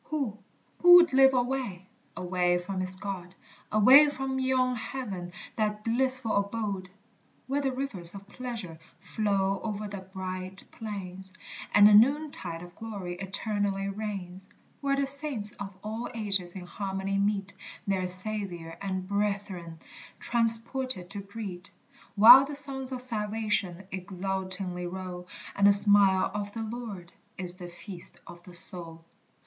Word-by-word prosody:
Who, 270 -9 -3 0.4
who 355 0 +9
would 345 -4 +7
live 265 0 +6
alway? 245 -7 -1 0.3
away 180 -1 +1
from 185 +2 -4
his 185 0 -1
God, 185 -2 -6 0.4
Away 260 +8 +8
from 265 -1 -3
yon 255 -1 +2
heaven, 210 -7 -5 0.3
that 210 -1 -1
blissful 255 0 +1
abode, 200 -2 -2 0.6
Where 275 +3 -1
the 270 -1 0
rivers 230 -10 0
of 200 0 -10
pleasure 220 -8 -6 0.2
flow 195 0 0
o'er 210 -1 -3
the 200 -1 -6
bright 185 0 -5
plains, 190 -3 -7 0.4
And 205 0 +8
the 210 - +6
noontide 225 - +3
of 175 0 -12
glory 200 -6 -6
eternally 195 0 -1
reigns; 195 -2 -6 0.3
Where 275 -1 +1
the 275 0 +1
saints 275 -7 -4
of 195 -1 -5
all 220 +3 -4
ages 195 -5 0
in 185 -2 -7
harmony 195 +1 -3
meet, 200 -1 0 0.3
Their 190 -2 0
Saviour 185 -3 -4
and 190 -2 -3
brethren 200 -4 -2 0.4
transported 230 -3 0
to 200 - -4
greet, 195 -2 -7 0.5
While 225 +6 +10
the 290 +1 -6
songs 270 -2 -2
of 255 -1 -2
salvation 210 -5 -2
exultingly 185 -1 -3
roll 180 -1 -6 0.3
And 200 0 +5
the - - +8
smile 200 -2 +5
of 205 -1 -4
the 225 - -4
Lord 215 -6 -7 0.2
is 180 0 -4
the 175 -2 -8
feast 175 +1 -8
of 175 - -12
the 175 0 -8
soul. 165 -2 -2
200 Hz, 140 wpm, -28 LUFS, 185-230 Hz, 0.6 s, While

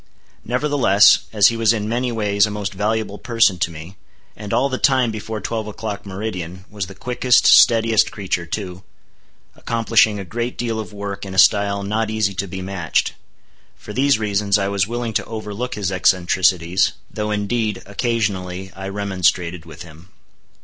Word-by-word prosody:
Nevertheless, 125 -5 +4
as 105 -2 +5
he 115 - -3
was 115 0 +3
in 105 -2 -3
many 120 +2 -1
ways 105 -2 +1
a - - -5
most 105 -1 -4
valuable 105 +1 -2
person 115 -7 +2
to 85 - 0
me, 85 +4 -11 0.4
and 105 -1 -8
all 120 +4 +2
the 130 -2 -3
time 130 -4 +3
before 110 0 -5
twelve 110 0 -4
o'clock, 105 -1 -6
meridian, 95 -2 -6
was 100 -3 -4
the 95 - -11
quickest, 125 +3 +2
steadiest 115 -2 +5
creature 95 -4 -3
too, 95 0 -5 0.7
accomplishing 115 -2 +2
a 100 - -6
great 120 +6 -4
deal 115 -2 -2
of 110 - -6
work 100 -1 -6
in 95 -1 -7
a - - -6
style 100 +1 +4
not 110 +2 -1
easy 110 -2 0
to 100 +1 -3
be 95 0 -6
matched—for 95 +2 -5
these 135 +2 +3
reasons, 105 -1 +1
I 100 -1 -1
was 100 -1 0
willing 120 0 -3
to - - -1
overlook 110 +3 -5
his 100 -3 -2
eccentricities, 90 -1 +2 0.2
though 105 0 -3
indeed, 105 0 -2
occasionally, 95 -4 -2
I 95 0 -6
remonstrated 90 -4 -1
with 80 +2 -10
him. 85 +2 -15
105 Hz, 165 wpm, -20 LUFS, 95-115 Hz, 0.7 s, as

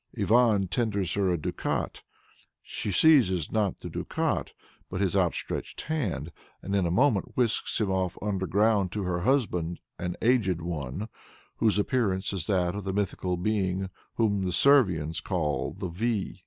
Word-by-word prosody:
Ivan 110 -4 +4
tenders 100 -4 -1
her 100 -2 +1
a 90 - +1
ducat. 75 - -3 0.6
She - - -4
seizes, 95 - +4
not 105 -4 0
the - - -6
ducat, - - -2 0.4
but 90 - -4
his 100 -1 +1
outstretched 90 -4 -1
hand, 95 - -2 0.3
and 100 - -2
in 95 -3 +2
a - - 0
moment 115 +2 +1
whisks 120 -3 0
him 105 -3 0
off 95 -2 -1
underground 100 0 +1
to 105 - -2
her 90 -1 -1
husband, 90 -8 0 0.2
an 90 0 -3
Aged 110 -8 +3
One, 85 - -4 0.5
whose 110 -2 +2
appearance 100 -4 0
is 90 -4 -3
that 90 -3 +1
of 100 0 -5
the 95 0 -3
mythical 95 -2 -1
being 95 -1 -1 0.2
whom 105 -4 +1
the 95 -1 -1
Servians 90 - +3
call 75 -4 -1
the 95 -1 -3
Vy. 105 +2 -2
95 Hz, 155 wpm, -28 LUFS, 90-110 Hz, 0.6 s, Ivan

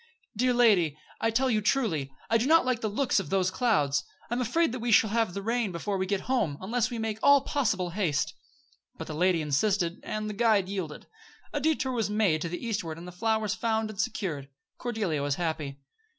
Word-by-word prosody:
"Dear 250 +3 +2
lady 190 -11 +4 0.2
I 225 - +1
tell 250 +4 +2
you, 220 -4 +2
truly, 200 - 0 0.2
I 230 - +3
do 240 - 0
not 325 -1 +5
like 250 -2 0
the 215 - -1
looks 240 +2 +1
of 195 - -5
those 185 -1 +1
clouds. 150 - +1 0.3
I'm 240 +1 0
afraid 325 +3 +1
we 240 -1 -2
shall 215 -1 +5
have 225 -5 0
rain 225 +1 -1
before 190 +3 -3
we 190 - -1
get 200 0 0
home, 220 - 0
unless 230 +4 0
we 240 - -4
make 220 -1 -3
all 280 -1 +6
possible 215 - 0
haste." 155 -6 0 0.6
But 160 - -6
the 155 - -6
lady 175 0 +2
insisted; 175 +4 +1
and 215 0 -4
the 210 - -4
guide 210 -3 +3
yielded. 185 -7 -5 0.5
A 290 - 0
detour 285 -3 +1
was 230 -4 -1
made 205 -7 +2
to 170 - -2
the 175 +7 -5
eastward 190 -8 -3
and 170 +2 -9
the - - -7
flowers 220 +2 0
found 220 -1 -1
and 200 - -2
secured. 155 -10 -3 0.3
Cordelia 215 -11 -1
was 145 0 0
happy. 160 -5 -3
210 Hz, 205 wpm, -28 LUFS, 170-235 Hz, 0.6 s, all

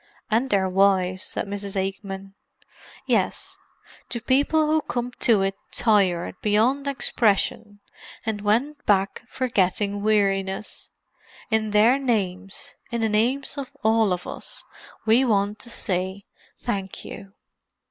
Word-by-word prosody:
"And 235 +5 +2
their 195 -4 +2
wives," 185 -1 +2
said - - -3
Mrs. 200 0 -4
Aikman. 195 0 -5 0.7
"Yes—to 235 - -3
people 285 +6 +3
who 310 +1 +2
came 245 0 -2
to 220 -5 +4
it 195 0 0 0.2
tired 195 -6 +2
beyond 235 +7 +2
expression; 210 -5 +1 0.4
and 215 -2 -2
went 245 +9 0
back 195 -1 +2
forgetting 205 -4 0
weariness. 195 -2 0 0.6
In 220 -1 +2
their 220 +6 +5
names—in 200 -1 -3
the 225 - +2
names 255 +7 0
of 270 -2 -5
all 220 -2 +3
of 180 -1 -2
us—we 230 +4 -2
want 210 -3 +1
to 240 - -6
say 190 -2 -1 0.3
'Thank 195 -5 -4
you. 195 0 -9
210 Hz, 115 wpm, -24 LUFS, 195-235 Hz, 0.7 s, their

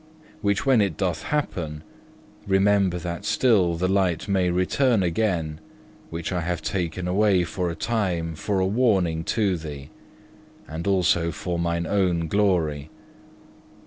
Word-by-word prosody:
Which 100 +2 0
when 130 -5 +4
it 95 -7 0
doth 90 -5 -1
happen, 80 - -3 0.6
remember 95 -2 +3
that 85 0 -5
still 105 -6 +3
the 90 +3 0
light 95 -3 +1
may 95 -3 +2
return 95 +5 +2
again, 85 -4 -1 0.5
which 85 +1 -4
I 90 -2 -1
have 85 -1 -3
taken 90 0 -2
away 95 0 +3
for 90 +1 -2
a 85 - -4
time 90 -5 -1
for 95 +5 -2
a 95 - +2
warning 95 -7 +1
to 100 -5 +1
thee, 75 -4 -8 0.8
and 80 +4 -5
also 90 -3 +2
for 85 +2 -4
mine 85 0 -1
own 90 -3 +1
glory. 80 -7 +1
90 Hz, 140 wpm, -24 LUFS, 85-100 Hz, 0.8 s, when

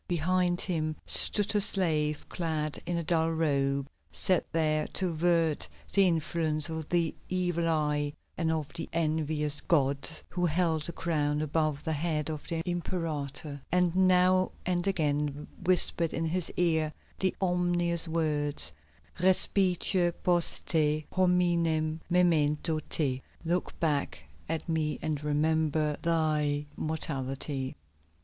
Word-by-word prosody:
Behind 175 +1 +1
him 155 -4 -1
stood 210 +1 +2
a 205 - +4
slave 155 -7 +1
clad 155 -3 -2
in 175 -1 -1
a 170 - -1
dull 165 0 +2
robe, 140 -4 0 0.2
set 165 - +1
there 155 -1 +1
to 185 -2 +2
avert 165 -1 +1 0.2
the 195 -1 +6
influence 160 -2 0
of 160 -1 -5
the 170 -2 +1 0.2
evil 175 -2 0
eye 150 -2 0 0.2
and 165 -2 0
of 155 -3 -1
the 165 -2 -5
envious 155 -2 0
gods, 140 0 +1
who 180 0 -3
held 160 -1 +1
a - - -2
crown 150 -3 -1
above 155 -1 -1
the 160 - -1
head 155 0 -1
of 155 -2 -7
the 165 -1 -2
Imperator, 155 -5 -3
and 180 -1 +2
now 185 0 +4
and 180 +1 0
again 150 -5 -1 0.2
whispered 175 -2 +1
in 165 - -1
his 175 +1 -1
ear 160 -3 +2 0.3
the 190 -1 +1
ominous 175 -2 +1
words, 150 - +1 0.5
Respice 185 +1 +4 0.3
post 175 -2 +1
te, 155 -1 +1
hominem 170 -4 +2
memento 160 -3 +2
te 135 -4 -1 0.2
("Look 175 +2 -1
back 140 - -1 0.3
at 165 -1 -2
me 155 -4 0
and 150 -2 -2
remember 155 0 +1
thy 155 -3 +1
mortality.") 135 -3 -3
160 Hz, 125 wpm, -29 LUFS, 150-175 Hz, 0.5 s, the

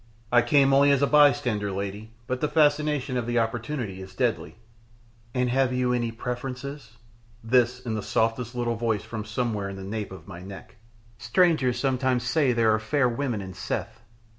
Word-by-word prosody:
"I 120 0 +6
came 135 +1 +4
only 140 +1 +5
as 140 0 +3
a - - +6
bystander, 125 -8 +3
lady, 100 +3 -5 0.2
but 130 +1 -3
the 150 - +2
fascination 150 -3 +2
of 120 -2 -2
the 120 0 0
opportunity 115 -3 -2
is 95 0 -11
deadly 120 -3 -1 0.4
" 115 0 -29
"And 125 0 +1
have 130 0 +2
you 125 0 +1
any 120 -2 -1
preference?" 125 +1 -6 0.5
this 125 +1 +2
in 120 -3 -4
the 110 - -2
softest 115 +3 -1
little 120 -1 -1
voice 110 -3 -1
from 110 -2 -6
somewhere 110 -3 -2
in 100 - -7
the 95 - -8
nape 105 +1 -4
of 90 -4 -11
my 90 -3 -9
neck. 95 +3 -11 0.4
"Strangers 155 - +2
sometimes 130 -1 0
say 130 +1 +2
there 115 -2 +3
are 110 - +1
fair 125 +4 +1
women 120 -3 -2
in 95 -1 -8
Seth." - - -4
120 Hz, 185 wpm, -26 LUFS, 110-130 Hz, 0.5 s, I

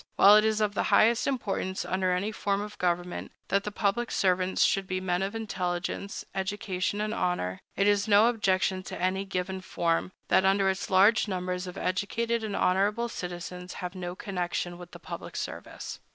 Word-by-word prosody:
While 200 +2 +8
it 215 - +6
is 220 0 +1
of 210 -1 +1
the - - 0
highest 230 +2 +4
importance, 200 -7 -2
under 185 0 0
any 190 +4 0
form 200 -2 -1
of 210 0 -6
government, 175 0 -1 0.2
that 200 +1 +1
the 210 - -3
public 225 +3 0
servants 185 -1 +2
should 195 -1 +2
be 185 0 -1
men 180 -1 -1
of 195 +3 -2
intelligence, 185 -2 -3
education, 195 0 -2
and 215 +1 -1
honor, 95 - -1 0.2
it 195 - +2
is 205 0 +3
no 205 +1 +6
objection 190 -5 +1
to - - -6
any 185 +2 0
given 190 0 -3
form, 170 -1 -1 0.2
that 190 - +5
under 195 0 +3
it 190 - -5
large 200 +4 +5
numbers 180 -1 -3
of 180 - -7
educated 225 +5 -1
and 210 -2 -3
honorable 205 +6 +2
citizens 180 -1 -6
have 180 0 -5
no 180 -1 -5
connection 175 -3 -3
with 175 -1 -10
the - - -11
public - - -8
service. - - -6
190 Hz, 180 wpm, -28 LUFS, 180-205 Hz, 0.2 s, While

